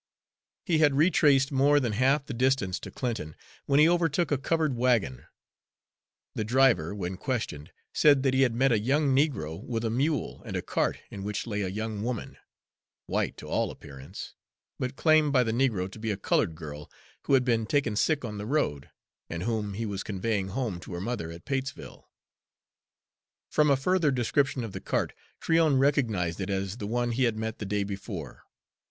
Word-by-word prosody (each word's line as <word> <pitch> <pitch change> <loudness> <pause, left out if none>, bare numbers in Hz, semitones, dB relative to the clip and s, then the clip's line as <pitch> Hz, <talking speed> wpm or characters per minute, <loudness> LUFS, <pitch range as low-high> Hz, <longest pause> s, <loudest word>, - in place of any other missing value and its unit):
He 165 -4 +2
had 145 -3 +4
retraced 145 -3 +4
more 145 +2 +4
than 120 -5 -1
half 135 +6 +2
the 140 - -5
distance 125 -6 +1
to - - -8
Clinton 110 - -4 0.3
when 140 +1 +4
he 155 - +7
overtook 170 -1 +1
a 145 - +3
covered 155 -1 0
wagon. 115 - +1 1.1
The - - -2
driver, 110 -7 +3
when 95 -2 -4
questioned, 95 - -3 0.2
said 145 -3 +5
that 135 -2 +2
he 130 - +3
had 125 -4 +3
met 135 +2 +3
a 115 - +3
young 135 +4 +2
negro 125 - 0
with 115 -1 -3
a 110 - 0
mule, 140 +5 -1
and - - -6
a - - -3
cart - - 0
in 100 - -7
which 105 0 -3
lay 105 -3 -2
a 95 - -1
young 105 +2 -4
woman, 120 0 -4 0.7
white - - -1
to - - -9
all - - 0
appearance, 70 +7 -10 0.5
but 125 +1 -3
claimed 155 -1 +4
by 125 -2 +5
the 115 - -1
negro 115 -6 +1
to 110 - -11
be 110 0 -3
a 105 - -1
colored 80 -4 +1
girl 75 -2 -8 0.4
who 140 - +5
had 130 -2 +3
been 115 -3 +1
taken 135 -5 +1
sick 145 +4 +1
on 105 -2 -5
the 105 - -5
road, 115 - -1 0.4
and 85 +1 -4
whom 105 -3 -2
he 115 +2 -3
was 100 -2 -3
conveying 100 0 -2
home 105 -3 -3
to 90 - -9
her - - -4
mother 115 -6 -3
at 85 +1 -10
Patesville. 135 0 -5 1.4
From 150 -1 +3
a 140 - +4
further 170 +3 +2
description 135 +1 +1
of 115 - -5
the - - -7
cart - - -1 0.3
Tryon 160 -4 +3
recognized 110 - +1
it 95 - -3
as 95 +1 -2
the 105 - -5
one 120 +2 0
he 125 +2 +2
had 115 -2 0
met 110 0 -4
the 105 - -4
day 105 0 0
before. 100 - -7
120 Hz, 190 wpm, -28 LUFS, 100-135 Hz, 1.4 s, he